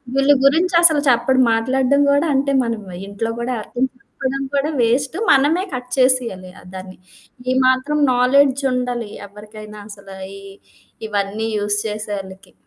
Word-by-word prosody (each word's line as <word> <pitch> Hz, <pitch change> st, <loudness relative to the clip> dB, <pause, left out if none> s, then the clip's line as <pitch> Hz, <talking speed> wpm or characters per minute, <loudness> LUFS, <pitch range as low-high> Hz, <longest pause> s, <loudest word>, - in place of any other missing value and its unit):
వీళ్ళ 275 Hz, +1 st, +3 dB
గురించి 335 Hz, +6 st, +3 dB
అసలు 315 Hz, -3 st, +5 dB
చెప్పడు 260 Hz, +2 st, +2 dB
మాట్లాడడం 265 Hz, +4 st, +1 dB
గూడా 285 Hz, +3 st, +2 dB
అంటే 275 Hz, +1 st, +1 dB
మనం 230 Hz, -2 st, -3 dB, 0.3 s
ఇంట్లో 200 Hz, +3 st, -4 dB
గూడా, 245 Hz, +1 st, -2 dB
ఎవరికైనా 250 Hz, +4 st, -3 dB
చెప్పుకోడం 270 Hz, 0 st, -5 dB
కూడా 280 Hz, +2 st, 0 dB
వేస్టు. 265 Hz, +8 st, 0 dB
మనమే 300 Hz, +7 st, +3 dB
కట్ 250 Hz, 0 st, -6 dB
చేసేయాలి 245 Hz, -8 st, +1 dB
ఆహ్, -, -, -17 dB
దాన్ని. 185 Hz, 0 st, -9 dB, 0.5 s
ఈ -, -, +2 dB
మాత్రం 270 Hz, +4 st, +1 dB
నాలెడ్జుండాలి 250 Hz, -3 st, +1 dB, 0.2 s
ఎవ్వరికైనా 210 Hz, +1 st, -12 dB
అసల, 200 Hz, -1 st, -13 dB, 0.3 s
ఈ -, -, -14 dB, 0.7 s
ఇవన్నీ 205 Hz, +2 st, -2 dB
యూజ్ 205 Hz, 0 st, -1 dB
చేసోవోళ్ళకి. 205 Hz, -3 st, -7 dB
250 Hz, 135 wpm, -19 LUFS, 210-275 Hz, 0.7 s, అసలు